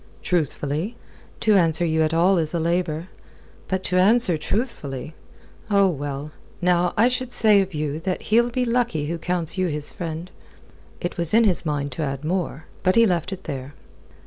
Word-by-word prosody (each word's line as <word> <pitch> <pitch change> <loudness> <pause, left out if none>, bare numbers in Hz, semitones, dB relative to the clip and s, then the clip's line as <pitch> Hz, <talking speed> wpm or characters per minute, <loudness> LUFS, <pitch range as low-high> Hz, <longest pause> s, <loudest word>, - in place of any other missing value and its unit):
"Truthfully? 160 - -1 0.5
To 215 - +4
answer 170 -3 +3
you 160 -1 +1
at 155 0 +2
all 175 +3 +3
is 160 +1 -2
a - - +1
labour. 170 0 -1 0.6
But 190 0 -2
to 180 - +1
answer 205 -1 +5
truthfully! 155 - -3 0.6
Oh, 200 -1 +4
well, 145 -1 -4 0.3
now, 180 -1 +2
I 225 +3 +5
should 250 0 -1
say 215 -4 +5
of 190 -3 -4
you 150 0 -2
that 185 +2 -3
he'll 235 +1 +5
be 250 +1 -1
lucky 235 -10 0
who 165 +2 -3
counts 175 +1 -1
you 185 - +2
his 150 -2 -3
friend." 170 0 -6 0.7
It 175 - -4
was 170 +4 +1
in 230 - +6
his 180 -5 +1
mind 145 -1 -2
to 125 - -5
add 140 0 -3
more. 165 -3 -2 0.2
But 185 - +2
he 230 0 +6
left 180 -2 0
it 190 -1 -6
there. 135 -1 -6
175 Hz, 180 wpm, -23 LUFS, 155-195 Hz, 0.7 s, in